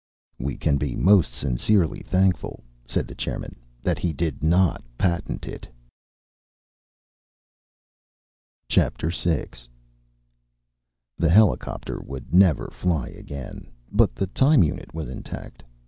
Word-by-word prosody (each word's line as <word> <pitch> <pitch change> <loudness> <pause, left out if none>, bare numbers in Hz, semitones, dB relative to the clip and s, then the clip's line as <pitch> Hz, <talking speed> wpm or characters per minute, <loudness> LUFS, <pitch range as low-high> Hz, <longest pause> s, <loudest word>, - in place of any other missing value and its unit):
"We 70 +2 -3
can 75 -3 +1
be 70 -3 -2
most 95 -8 +5
sincerely 70 - +1
thankful," 95 0 0 0.2
said - - -1
the - - -9
chairman, - - -5 0.3
"that - - 0
he 85 - -1
did 75 -1 -2
not 85 +2 +3
patent 85 +1 -1
it." - - -8 3.0
VI - - +3 2.3
The 85 - +3
helicopter 105 +3 +2
would 65 +3 -9
never 90 -6 +5
fly 85 -8 -1
again, 70 -3 -9 0.2
but - - +3
the 80 - 0
time 135 - +4
unit 75 - -3
was 80 -2 -5
intact. 65 - -8
80 Hz, 105 wpm, -24 LUFS, 70-95 Hz, 3.0 s, most